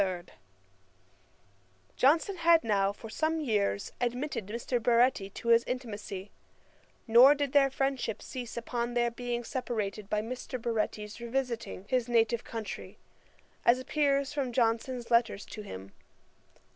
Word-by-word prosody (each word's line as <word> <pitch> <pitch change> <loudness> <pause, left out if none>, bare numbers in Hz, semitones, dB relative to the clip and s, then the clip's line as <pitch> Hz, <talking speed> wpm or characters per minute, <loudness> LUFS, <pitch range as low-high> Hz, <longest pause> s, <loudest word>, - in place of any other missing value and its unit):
[*] - - +5 1.9
Johnson 325 +8 +3
had 335 -1 +5
now 200 -3 +2
for 215 +2 -10
some 315 +8 -1
years 210 -8 0
admitted 245 -2 -2
Mr. 235 +3 -2
Baretti 235 -4 +3
to 235 - -4
his 230 0 +6
intimacy; 210 -6 -5 0.7
nor 250 +5 +8
did 285 -2 -2
their 280 -1 +5
friendship 270 -4 -1
cease 245 -2 -7
upon 240 0 -3
their 240 -1 +2
being 240 0 -3
separated 215 -5 -3
by 210 0 0
Baretti's 230 -3 -3
revisiting 235 -5 -3
his 250 -1 0
native 230 0 +2
country, 225 -2 -7 0.7
as 235 +1 +5
appears 280 +1 0
from 275 -4 -1
Johnson's 235 +1 0
letters 235 -3 +2
to 215 - -8
him. 95 - -9
235 Hz, 125 wpm, -30 LUFS, 220-260 Hz, 1.9 s, nor